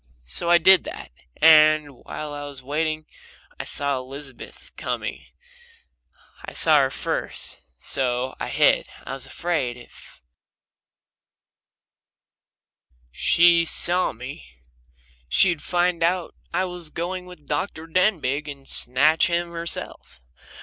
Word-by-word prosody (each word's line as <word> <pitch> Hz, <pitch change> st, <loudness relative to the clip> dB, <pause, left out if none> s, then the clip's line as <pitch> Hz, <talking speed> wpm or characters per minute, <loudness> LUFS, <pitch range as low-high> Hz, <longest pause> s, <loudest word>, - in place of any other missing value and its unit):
So 170 Hz, -, -1 dB
I 175 Hz, -, +7 dB
did 185 Hz, +2 st, +6 dB
that, -, -, -8 dB, 0.3 s
and 155 Hz, -2 st, +6 dB
while 150 Hz, +4 st, -8 dB
I 145 Hz, 0 st, -6 dB
was 140 Hz, -2 st, -7 dB
waiting 155 Hz, +3 st, -2 dB, 0.5 s
I -, -, -4 dB
saw 140 Hz, -1 st, +2 dB
Aunt 130 Hz, -, -9 dB
Elizabeth 140 Hz, 0 st, -10 dB
coming -, -, -5 dB, 1.2 s
I -, -, -8 dB
saw 155 Hz, -2 st, +5 dB
her 135 Hz, -1 st, +2 dB
first, -, -, -4 dB, 0.2 s
so 125 Hz, -, -1 dB
I -, -, -3 dB
hid -, -, +3 dB, 0.2 s
I -, -, -5 dB
was 135 Hz, -, -5 dB
afraid 160 Hz, -9 st, -2 dB
if 120 Hz, -, -16 dB, 2.9 s
she 170 Hz, -, +5 dB
saw 175 Hz, +2 st, +2 dB
me 65 Hz, -, -9 dB, 0.8 s
she'd 170 Hz, -, +3 dB
find 175 Hz, -1 st, 0 dB
out 175 Hz, +1 st, 0 dB, 0.2 s
I 185 Hz, -, 0 dB
was 175 Hz, -3 st, -5 dB
going 180 Hz, +3 st, -4 dB
with 180 Hz, -5 st, -14 dB
Dr. 155 Hz, +2 st, -3 dB
Denbigh 160 Hz, -5 st, 0 dB
and 140 Hz, -2 st, -8 dB
snatch 150 Hz, +6 st, +2 dB
him 170 Hz, 0 st, -1 dB
herself. 170 Hz, -, -5 dB
155 Hz, 120 wpm, -23 LUFS, 140-175 Hz, 2.9 s, I